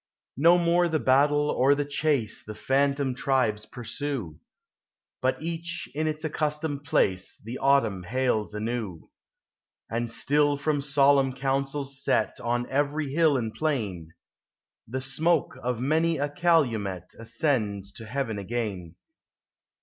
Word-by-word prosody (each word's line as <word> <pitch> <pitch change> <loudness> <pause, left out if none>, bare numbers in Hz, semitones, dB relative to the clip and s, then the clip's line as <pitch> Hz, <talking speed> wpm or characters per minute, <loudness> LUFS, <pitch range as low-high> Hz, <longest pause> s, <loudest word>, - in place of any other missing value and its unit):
No 170 +5 +6
more 175 0 +3
the 160 - +1
battle 145 +3 +3
or 135 +3 +4
the 145 0 -1
chase 145 -6 0
The 110 - -8
phantom 140 +1 +1
tribes 125 -5 0
pursue, 120 - -5 0.8
But 130 0 +1
each 170 +1 -3
in 155 +2 -1
its 155 0 -3
accustomed 150 -2 -2
place 95 -9 +1
The 120 +3 -5
Autumn 115 -9 +2
hails 110 +1 -1
anew: 110 -5 -4 0.8
And 120 +1 -1
still 145 +4 +2
from 145 0 0
solemn 140 -1 +3
councils 135 +1 -2
set 110 - +1
On 120 +1 -1
every 145 +1 0
hill 155 -3 +4
and 115 -3 -3
plain, 105 - -3 0.7
The 130 +4 -3
smoke 150 +3 +1
of 125 -1 -2
many 160 +5 +1
;i 145 +1 0
calumel 130 - +1 0.2
Ascends 110 - -1
to 110 +1 -10
heaven 115 -4 -2
again. 100 -5 -4
135 Hz, 125 wpm, -27 LUFS, 115-145 Hz, 0.8 s, No